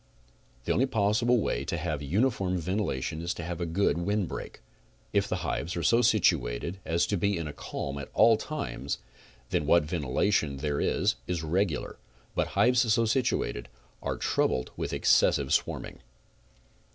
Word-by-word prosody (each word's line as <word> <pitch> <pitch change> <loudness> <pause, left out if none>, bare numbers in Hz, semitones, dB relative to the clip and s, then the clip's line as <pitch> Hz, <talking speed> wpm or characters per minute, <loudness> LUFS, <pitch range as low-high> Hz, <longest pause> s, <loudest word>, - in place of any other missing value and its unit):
The - - 0
only 130 - +2
possible 115 +1 +2
way - - -1
to 85 - -2
have 75 -3 -3
uniform 95 - 0
ventilation 80 -5 -2
is 85 +1 -2
to 85 - -6
have 85 +1 -4
a 85 - -1
good 85 0 +1
wind 100 +1 0
break. - - -7 0.5
If - - +2
the - - -1
hives 85 +2 -2
are 85 - -2
so 115 +7 +4
situated 85 - +1
as 85 +1 +1
to 100 - -1
be 100 +2 +1
in 85 -2 -3
a 75 - -6
calm 70 0 -5
at 70 - -7
all 115 -1 +6
times 110 - -4 0.5
then 75 - 0
what 85 +1 +5
ventilation 75 0 0
there 70 +1 -1
is - - +1
is 90 -3 -2
regular, 85 +1 -1 0.3
but - - 0
hives 125 -2 +4
so 115 +1 +3
situated 110 - 0 0.3
are - - -2
troubled 60 - 0
with - - -3
excessive 70 -1 +3
swarming. - - -1
85 Hz, 165 wpm, -28 LUFS, 75-105 Hz, 0.5 s, all